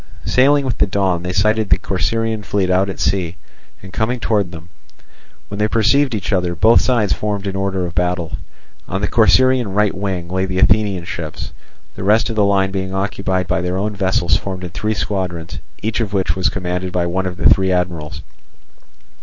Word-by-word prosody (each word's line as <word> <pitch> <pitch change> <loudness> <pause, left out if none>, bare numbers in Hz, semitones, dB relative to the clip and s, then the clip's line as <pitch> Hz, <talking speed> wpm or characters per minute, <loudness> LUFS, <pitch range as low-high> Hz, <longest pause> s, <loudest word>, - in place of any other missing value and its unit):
Sailing 140 +2 +3
with 125 -4 -2
the - - +3
dawn, 95 -3 0
they 90 +1 -3
sighted 105 +3 +1
the - - +5
Corcyraean 110 +5 -1
fleet 95 -2 -1
out 95 +2 +2
at 95 - -6
sea 90 -2 0 0.5
and 95 -1 -11
coming 120 +3 -1
towards 105 -5 0
them. 85 0 -11 0.8
When 100 - -7
they 105 - +2
perceived 115 +4 +2
each 100 0 -3
other, 90 -2 0
both 110 +7 +5
sides 115 -6 +2
formed 105 -1 -3
in 95 -1 -3
order 95 -2 -1
of 85 - -6
battle. 90 -2 -1 0.5
On 95 - -3
the 105 - +1
Corcyraean 120 +4 +4
right 105 -1 +2
wing 95 -3 -3
lay 95 +1 -1
the 95 0 -3
Athenian 100 -3 +2
ships, 80 -3 -6 0.4
the - - -6
rest 110 +3 +3
of - - -4
the 105 - +3
line 95 -1 +2
being 95 -1 -3
occupied 95 -1 -1
by 85 - 0
their 90 +1 -2
own 105 +2 -2
vessels 95 -3 +1
formed 95 -2 -4
in 90 - -6
three 105 +4 -2
squadrons, 90 -5 -3 0.2
each 110 +2 -1
of 105 -3 -2
which 95 -5 0
was 95 +2 +1
commanded 90 -1 -3
by 90 -1 0
one 95 +2 -1
of 90 -1 -6
the 80 - +4
three 95 -1 +3
admirals. 85 -4 -2
95 Hz, 195 wpm, -18 LUFS, 90-105 Hz, 0.8 s, the